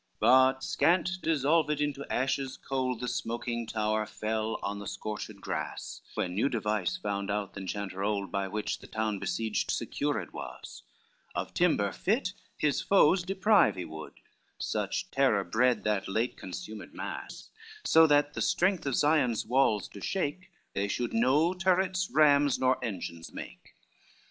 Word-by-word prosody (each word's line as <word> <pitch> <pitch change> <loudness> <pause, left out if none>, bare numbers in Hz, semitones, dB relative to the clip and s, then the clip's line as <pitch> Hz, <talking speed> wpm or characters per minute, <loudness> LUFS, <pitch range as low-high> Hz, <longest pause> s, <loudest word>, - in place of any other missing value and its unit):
I - - -42
But 130 +1 +5
scant, 185 +1 +2
dissolved 150 0 +2
into 145 -1 -2
ashes 130 +1 -1
cold, 130 -3 -2
The 125 - -2
smoking 120 0 -3
tower 110 -1 0
fell 110 +1 -2
on 100 0 -3
the 100 - -7
scorched 105 0 -5
grass, 90 -6 -5
When 90 - -1
new 110 +9 +1
device 105 -6 -1
found 100 -1 -3
out 100 -1 -2
the 100 - -7
enchanter 95 0 -4
old 100 -3 -1
By 100 -1 -1
which 105 +2 -3
the - - -13
town 110 -2 -2
besieged 110 +3 -1
secured - - -2
was, - - -8 0.5
Of - - -3
timber - - +2
fit - - 0 0.2
his 150 -2 +1
foes 185 -2 +4
deprive 195 +3 +3
he 90 -2 -4
would, 80 -1 -8 0.4
Such - - -2
terror 130 -8 +3
bred 125 +5 +2
that 105 -3 0
late 110 +5 0
consumed 95 +3 -8
mass: - - -7 0.3
So 160 0 +6
that 145 -1 +3
the - - -4
strength 185 -4 +1
of 135 - 0
Sion's 145 -7 +2
walls 120 -4 +2
to 100 - -11
shake, 185 0 -2 0.2
They 100 +1 0
should 120 +3 -2
no 140 +9 +3
turrets, 185 0 +1
rams, 145 -2 +5
nor 130 0 +1
engines 85 -7 -5
make. - - -10
120 Hz, 155 wpm, -30 LUFS, 105-145 Hz, 0.5 s, So